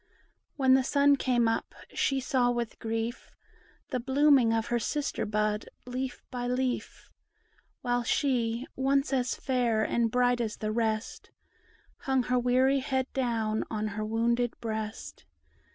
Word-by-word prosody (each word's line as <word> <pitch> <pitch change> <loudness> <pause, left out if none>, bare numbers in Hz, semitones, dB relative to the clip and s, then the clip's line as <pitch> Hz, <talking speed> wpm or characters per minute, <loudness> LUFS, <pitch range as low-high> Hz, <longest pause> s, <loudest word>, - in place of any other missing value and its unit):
When 265 -2 +4
the 265 0 +5
sun 285 +1 +4
came 245 -3 +1
up, 225 - -2 0.2
she 270 -1 +1
saw 250 -1 +1
with 240 -2 -3
grief 225 +1 -3 0.6
The 255 - 0
blooming 270 -1 +4
of 225 -1 +1
her 240 - +2
sister 295 +4 -2
bud 210 0 -1 0.2
leaf 255 +1 -4
by 245 -1 -3
leaf. 250 0 -3 0.7
While 245 -1 +1
she, 240 -2 0
once 275 +2 +1
as 255 -1 0
fair 240 -4 0
and 230 +1 +1
bright 245 +1 +2
as 220 -2 -3
the 215 0 -2
rest, 220 0 -2 0.7
Hung 265 -2 0
her 250 +1 +1
weary 255 +3 +3
head 265 0 -2
down 225 -4 0
on 215 -1 -2
her 215 +1 -4
wounded 235 +2 0
breast. 220 - -5
245 Hz, 140 wpm, -29 LUFS, 225-260 Hz, 0.7 s, the